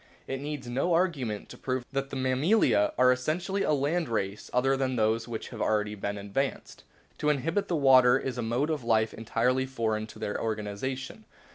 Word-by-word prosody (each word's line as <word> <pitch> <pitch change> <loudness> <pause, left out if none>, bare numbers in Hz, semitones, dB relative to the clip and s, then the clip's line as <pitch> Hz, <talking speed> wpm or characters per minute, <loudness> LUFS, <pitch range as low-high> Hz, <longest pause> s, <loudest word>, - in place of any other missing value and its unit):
It 135 0 -4
needs 145 -3 -5
no 135 +8 +1
arguments 140 - -1
to - - -11
prove 130 -1 -2
that 135 0 -2
the - - -6
Mammalia 130 - +3
are 125 0 +6
essentially 170 +10 -1
a - - +1
land 150 +3 0
race 100 -2 -3
other 135 +2 +2
than 130 -1 -1
those 115 +1 +1
which 115 -2 -5
have - - -7
already 105 -1 +1
been 100 0 -4
advanced. 100 +8 -3 0.4
To 150 - +1
inhabit 165 +8 0
the 175 - 0
water 130 -3 +6
is 130 -2 -4
a - - 0
mode 120 +7 0
of 150 -5 -2
life 110 -1 +2
entirely 125 +4 0
foreign 110 -4 -2
to - - -13
their 105 - -3
organisation. 115 - -4
130 Hz, 185 wpm, -28 LUFS, 110-140 Hz, 0.4 s, are